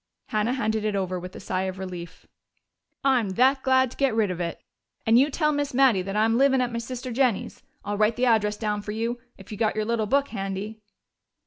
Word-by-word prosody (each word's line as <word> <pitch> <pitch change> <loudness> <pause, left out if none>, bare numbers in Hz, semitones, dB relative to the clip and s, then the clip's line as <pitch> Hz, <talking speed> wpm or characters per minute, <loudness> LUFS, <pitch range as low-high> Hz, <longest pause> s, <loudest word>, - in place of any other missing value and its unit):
Hannah 215 +3 0
handed 220 -4 -1
it 215 -1 -1
over 185 -2 -2
with 180 +1 -9
a - - -7
sigh 185 0 -2
of 190 0 -4
relief. 180 -3 -8 0.8
"I'm 255 -6 +2
that 265 +2 +4
glad 260 -2 +3
to - - -13
get 270 -5 +1
rid 215 -4 +2
of 180 -1 -4
it! 170 -1 -3 0.5
And 225 +2 +5
you 280 +3 +4
tell 300 +1 +1
Miss 290 -2 -2
Mattie 255 -7 +4
that 195 +2 -5
I'm 225 +2 +2
livin' 270 -1 +4
at 250 -1 0
my 235 - -1
sister 250 +2 -6
Jennie's. 245 -4 0 0.2
I'll 205 0 -2
write 215 +1 +3
the 250 - +1
address 210 -3 +2
down 210 -2 -2
for 210 0 -5
you, 230 +2 -2 0.2
if 195 +2 -14
you've 210 - -7
got 220 -2 +1
your 215 0 -1
little 225 -1 0
book 280 +4 +2
handy." 200 +1 -5
220 Hz, 225 wpm, -25 LUFS, 205-255 Hz, 0.8 s, And